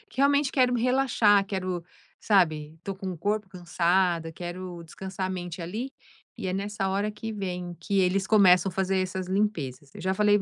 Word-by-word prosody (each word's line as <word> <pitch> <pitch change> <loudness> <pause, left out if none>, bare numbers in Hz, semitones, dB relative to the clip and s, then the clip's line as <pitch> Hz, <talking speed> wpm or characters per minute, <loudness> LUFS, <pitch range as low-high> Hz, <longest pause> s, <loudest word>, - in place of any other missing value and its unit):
realmente 280 +1 +3
quero 250 -2 +3
me 235 - 0
relaxar, 245 -6 +4
quero 185 -3 -3 0.4
sabe, 160 -6 +2
tô 195 - -4
com 190 -1 -5
o 175 - -7
corpo 205 +3 -1
cansado, 175 -1 +1
quero 175 0 -6
descansar 190 +3 -5
a - - -5
mente 175 -2 -5
ali, 220 +10 -4 0.5
e 190 - -4
é 185 - -1
nessa 195 0 -2
hora 200 +2 0
que 220 +1 -6
vem 180 -4 -4
que 195 +4 0
eles 190 +1 +2
começam 195 -3 +5
a 180 - -10
fazer 190 0 +1
essas 185 0 -3
limpezas. 165 -9 -1
Eu - - -9
já 185 +2 0
falei 205 +1 +4
para - - -3
190 Hz, 190 wpm, -27 LUFS, 175-205 Hz, 0.5 s, começam